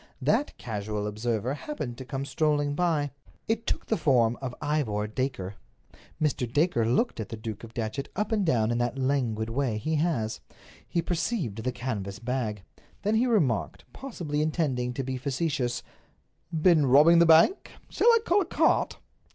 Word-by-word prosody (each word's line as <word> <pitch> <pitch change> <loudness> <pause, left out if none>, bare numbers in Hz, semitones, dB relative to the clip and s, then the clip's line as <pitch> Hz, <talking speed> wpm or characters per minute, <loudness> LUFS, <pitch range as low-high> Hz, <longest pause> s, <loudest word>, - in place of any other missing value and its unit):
That 290 - +1
casual 105 -2 -4
observer 110 +3 -1
happened 145 - -5
to 130 - -7
come 135 +1 -4
strolling 145 0 +1
by. 150 -3 0 0.4
It 225 0 -1
took - - -1
the 220 - 0
form 120 -7 +3
of 130 -2 -4
Ivor 120 -9 -1
Dacre. 105 -4 -3 0.6
Mr. 130 -6 0
Dacre 145 -5 +2
looked 130 - +1
the 110 0 -5
Duke 110 -1 -6
of 115 +1 -11
Datchet 120 +4 -3
up 210 +3 -1
and 215 -2 +2
down 120 -9 +2
in 120 - 0
that 120 +1 -1
languid 125 -5 0
way 125 -3 0
he 155 +8 -1
has. 145 -9 0 0.5
He 170 - 0
perceived 170 - -2
the 125 - 0
canvas 110 -6 -4
bag. 115 -4 -3 0.4
Then 210 +2 +1
he 230 +3 +3
remarked, 155 - 0
possibly 170 - -4
intending 145 -6 0
to 135 - -2
be 130 0 -3
facetious: 135 -2 -1 0.7
"Been 160 -3 +4
robbing 150 +6 +7
the 170 - +6
bank? 165 - +5 0.2
Shall - - +1
I 470 -1 +8
call 390 +4 +3
a - - -1
cart?" - - +2
135 Hz, 165 wpm, -27 LUFS, 115-160 Hz, 0.7 s, I